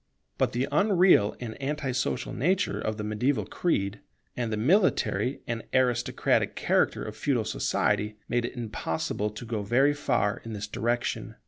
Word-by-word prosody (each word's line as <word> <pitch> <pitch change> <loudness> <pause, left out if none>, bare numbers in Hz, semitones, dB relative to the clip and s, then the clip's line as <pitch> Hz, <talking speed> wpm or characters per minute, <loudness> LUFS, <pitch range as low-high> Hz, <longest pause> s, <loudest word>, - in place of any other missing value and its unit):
But - - +2
the 125 +3 0
unreal 180 - +4
and 115 -3 -5
anti 140 -1 -2
social 125 0 -2
nature 185 +8 +1
of 110 0 -2
the 105 - -4
mediaeval 110 +2 0
creed, 100 - -1 0.4
and 120 -2 -2
the 110 - -1
military 145 - +2
and 115 -1 -3
aristocratic 125 -2 +2
character - - +1
of - - -6
feudal - - 0
society, 105 0 0
made 120 -1 0
it 125 - -6
impossible 105 -2 -2
to 105 +3 -9
go 110 -2 -2
very 130 +8 +3
far 120 -8 0
in 115 - -6
this 105 0 -4
direction. 120 +3 -2
120 Hz, 155 wpm, -27 LUFS, 105-135 Hz, 0.4 s, unreal